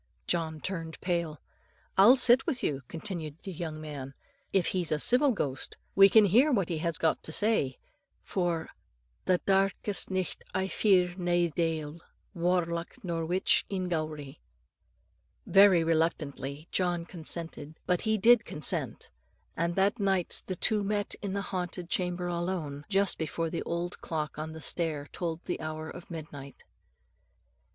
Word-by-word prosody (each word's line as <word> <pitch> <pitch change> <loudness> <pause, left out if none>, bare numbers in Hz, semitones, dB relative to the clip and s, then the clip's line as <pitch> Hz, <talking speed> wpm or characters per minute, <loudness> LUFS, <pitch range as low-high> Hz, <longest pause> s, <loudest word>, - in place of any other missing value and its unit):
John 160 -3 -2
turned 165 -4 -5
pale. 170 -4 -2 0.6
"I'll 210 +7 +8
sit 250 +2 +5
with 270 -7 -1
you," 140 -2 -1
continued 165 -4 -5
the 195 - -6
young 160 -3 -5
man. 140 -3 -7 0.4
"If 190 -3 +2
he's 175 -4 0
a 155 - +2
civil 255 - +4
ghost, 140 - -3 0.2
we 195 0 +8
can 215 +1 +7
hear 245 - +4
what 200 -9 +1
he 165 -3 -2
has 170 -1 -1
got 160 - +1
to - - -7
say; 180 - +1 0.5
for 175 -3 -2 0.6
'The 180 -1 +2
darkest 195 +1 +1
nicht 185 -1 -2
I 190 - 0
fear 185 -4 +3
nae 175 -1 +1
deil, 165 -1 -2 0.3
Warlock, 170 -1 -1
nor 165 -3 -2
witch 180 +3 +3
in 185 -2 -2
Gowrie.'" 155 -4 -4 1.1
Very 195 -4 +6
reluctantly 155 -3 -1
John 175 -2 0
consented; 160 -3 -3
but 180 -1 +1
he 220 -1 +1
did 230 +2 +6
consent; 150 - -2 0.4
and 170 +1 -1
that 200 +4 +2
night 195 -3 0
the 185 - -3
two 210 +3 +1
met 205 0 -1
in 200 -2 -3
the 200 0 -2
haunted 180 -2 -4
chamber 180 -1 -1
alone, 170 -5 -3
just 200 -1 +1
before 160 +1 -2
the 170 - -2
old 170 +1 -3
clock 155 -2 -4
on 160 +1 -5
the 160 - -9
stair 155 -3 -1
told 170 -2 -4
the - - -3
hour 155 0 -5
of 175 - -11
midnight. 145 -4 -9
175 Hz, 150 wpm, -29 LUFS, 160-190 Hz, 1.1 s, I'll